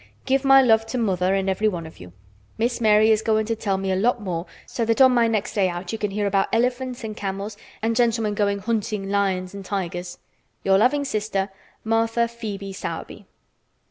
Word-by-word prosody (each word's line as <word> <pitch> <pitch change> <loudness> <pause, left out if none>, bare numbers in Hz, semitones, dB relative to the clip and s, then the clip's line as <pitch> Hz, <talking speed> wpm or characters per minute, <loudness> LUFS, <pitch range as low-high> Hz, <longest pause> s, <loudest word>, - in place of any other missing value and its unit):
Give 270 +1 +1
my 270 0 +7
love 225 -2 +3
to 250 - -3
mother 190 -4 +1
and 195 0 -1
everyone 190 -3 0
of 160 - -12
you. 90 0 -11 0.5
Miss 240 +2 -1
Mary 215 0 +5
is 215 0 +3
going 220 -1 +1
to 225 +1 -1
tell 200 -3 -1
me 195 0 -2
a - - +1
lot 235 +6 +1
more 180 -4 -4 0.2
so 235 - -3
that 230 +2 +1
on 260 -1 +7
my 240 -2 +3
next 215 -3 -1
day 195 -3 +2
out 175 +1 -5
you 225 - -4
can 210 - -1
hear 205 +1 -2
about 195 -1 +2
elephants 245 +1 -1
and 215 -1 -5
camels 200 +1 -4 0.3
and 225 0 +1
gentlemen 230 -3 +1
going 200 -1 +1
hunting 210 -1 -2
lions 190 -2 0
and 200 -1 -7
tigers. 180 -2 -4 0.5
"Your 195 0 +4
loving 285 +6 +2
sister, 210 -5 -1 0.3
"Martha 225 +1 +1
Phœbe 215 -4 -4
Sowerby." - - -7
210 Hz, 200 wpm, -23 LUFS, 195-230 Hz, 0.5 s, my